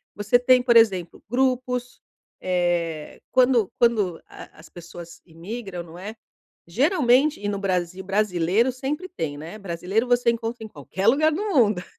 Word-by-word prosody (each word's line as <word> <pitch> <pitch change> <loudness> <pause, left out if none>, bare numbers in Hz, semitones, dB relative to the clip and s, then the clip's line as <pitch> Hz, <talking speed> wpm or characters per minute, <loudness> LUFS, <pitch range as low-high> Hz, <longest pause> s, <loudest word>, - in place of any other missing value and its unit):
Você 205 +4 +2
tem 250 0 +4
por 245 -1 +2
exemplo 190 -7 +2
grupos, 250 0 -1 0.4
eh, 175 -4 -2
quando 250 -5 +3
quando 210 -8 +1
a - - -11
a - - -17
as 155 - -15
pessoas 170 -1 -11
imigram, 180 +3 -7
não 170 0 -13
é? 205 +5 -8 0.5
Geralmente 275 - +2
e 205 - -3
no 205 - -2
Brasil 185 -1 -2
brasileiro 195 +3 +1
sempre 290 +8 -5
tem, 160 - -4
né? 160 +7 -9
Brasileiro 195 +4 -2
você 245 -1 +2
encontra 230 0 -5
em - - -7
qualquer 195 -1 -5
lugar 300 +6 +4
do 340 +7 -3
mundo. 210 -8 +3
210 Hz, 155 wpm, -23 LUFS, 175-245 Hz, 0.5 s, tem